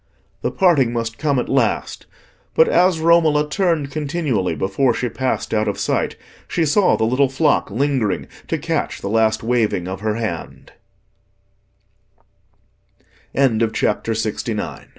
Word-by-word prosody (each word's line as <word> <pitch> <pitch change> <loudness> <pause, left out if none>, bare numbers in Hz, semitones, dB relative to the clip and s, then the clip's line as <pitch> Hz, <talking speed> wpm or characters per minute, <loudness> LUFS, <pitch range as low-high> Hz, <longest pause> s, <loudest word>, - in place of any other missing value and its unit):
The - - 0
parting 145 -11 +3
must 115 -1 -3
come 145 -3 +1
at 125 - -1
last, 130 -5 -1 0.5
but 160 - +5
as 180 -1 +3
Romola 160 -2 +3
turned 160 -4 0
continually 140 - -1
before 100 - +1
she 125 - -2
passed 130 -2 -2
out 110 0 +1
of 100 - -2
sight, - - -1 0.3
she 165 - 0
saw 185 +6 +3
the - - 0
little 130 +4 +2
flock 145 +3 +1
lingering 120 -3 0 0.2
to - - -1
catch - - -3
the 100 - -4
last 110 0 +1
waving 110 -6 0
of 95 0 -5
her 110 0 -1
hand. 110 -8 -5 2.6
CHAPTER 115 -3 +1
LXX. 110 0 -3
Meeting 110 -2 -1
Again. - - -7
125 Hz, 140 wpm, -20 LUFS, 110-150 Hz, 2.6 s, but